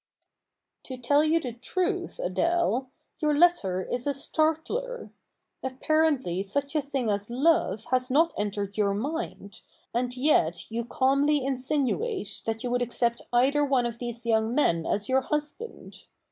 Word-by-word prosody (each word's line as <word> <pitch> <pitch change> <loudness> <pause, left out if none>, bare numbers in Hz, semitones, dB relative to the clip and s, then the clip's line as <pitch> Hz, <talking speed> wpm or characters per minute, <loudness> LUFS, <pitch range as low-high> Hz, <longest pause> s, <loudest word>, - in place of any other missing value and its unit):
To 260 - -6
tell 285 +5 +3
you 315 +2 +3
the 250 -7 -5
truth, 350 +10 -2
Adele, 340 - 0 0.3
your 300 -3 +1
letter 205 - +3
is 245 +6 -3
a 285 - 0
"startler!" 330 - -1 0.5
Apparently 265 - +1
such 280 +9 -3
a 305 - +3
thing 275 -4 -2
as 205 +1 -2
love 250 - +2
has 255 0 +1
not 320 +6 +3
entered 205 0 -3
your 200 -1 +2
mind, 255 - -5 0.3
and 245 +1 -1
yet 220 - +2
you 230 +1 -2
calmly 275 +3 +2
insinuate 275 - -1
that 225 0 -2
you 245 - -2
would 245 0 +1
accept 235 0 0
either 270 +5 +3
one 270 -4 +2
of 235 -1 -4
these 240 -1 -5
young 225 +1 +1
men 170 - +2
as 205 +2 0
your 265 0 +3
husband. 300 - -5
260 Hz, 145 wpm, -27 LUFS, 230-300 Hz, 0.5 s, tell